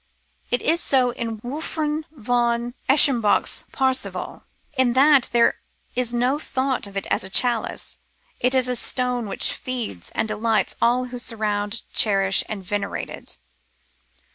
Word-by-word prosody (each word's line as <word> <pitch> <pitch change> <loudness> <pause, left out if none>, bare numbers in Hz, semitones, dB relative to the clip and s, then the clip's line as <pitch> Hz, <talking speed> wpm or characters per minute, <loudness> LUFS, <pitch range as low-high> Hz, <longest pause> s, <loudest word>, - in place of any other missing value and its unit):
It 245 - -1
is 335 +1 +2
so 255 -3 +2
in 230 -2 -5
Wolfran 300 +3 -2
von 240 -2 -1 0.2
Eschenbach's 260 -6 +4
Parzival, 265 -1 -2 0.3
In 260 -2 +2
that 275 0 +5
there 235 -1 +3 0.4
is 245 -1 -1
no 250 +4 +1
thought 265 -6 -2
of 200 0 -8
it 195 - -3
as - - +1
a 190 - -7
chalice: 240 +3 0 0.4
it 250 +2 +2
is 255 -1 +2
a 250 - -1
stone 250 -1 -1
which - - +1
feeds 240 - -5
and - - 0
delights 215 -1 0
all 250 +2 +2
who 245 - -4
surround, 210 -2 -1
cherish, 195 -2 +3
and 205 -3 -5
venerate 200 +1 -4
it. - - -8
240 Hz, 140 wpm, -22 LUFS, 220-260 Hz, 0.4 s, that